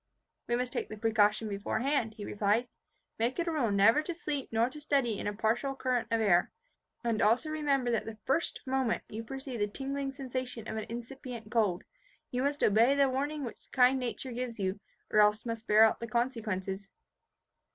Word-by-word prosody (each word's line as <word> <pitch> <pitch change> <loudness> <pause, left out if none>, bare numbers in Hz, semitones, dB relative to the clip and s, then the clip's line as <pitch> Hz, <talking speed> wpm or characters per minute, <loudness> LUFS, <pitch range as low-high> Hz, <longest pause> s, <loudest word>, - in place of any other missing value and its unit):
"We 240 - +1
must 250 +1 -2
take - - -3
the 215 - -7
precaution 215 0 +2
beforehand," 220 +4 -1
he 210 -2 -7
replied. 210 +4 +1 0.5
"Make 235 +3 0
it 345 - 0
a - - +1
rule 280 -8 +1
never 205 +7 +5
to 340 +2 -5
sleep 295 -5 -3
nor 225 +1 +3
to 295 +4 -9
study 270 -8 +1
in - - -3
a 205 - -1
partial 230 +6 0
current 250 -3 0
of 230 -1 +1
air; 180 -5 +3 0.5
and 230 -2 0
also 235 +9 +3
remember 280 -5 +1
that 230 - 0
the 225 -1 -7
first 295 +5 0
moment 260 -3 0
you 220 +2 -5
perceive 265 0 -6
the 205 - +2
tingling 275 +5 -3
sensation 255 -4 -5
of - - -4
an 220 -1 -4
incipient 240 -1 -7
cold, 210 -7 +1 0.5
you 250 - -1
must 285 +2 0
obey 230 +6 +5
the 280 -1 +4
warning 285 +3 -2
which 235 - -8
kind 260 +1 +5
nature 250 +1 -4
gives 245 -1 -4
you 190 +1 -1 0.3
or 215 - +4
else 210 +1 +4
must 230 -1 -4
bear 220 +1 +6
the 235 - -5
consequences." 210 -5 -2
235 Hz, 190 wpm, -31 LUFS, 215-270 Hz, 0.5 s, bear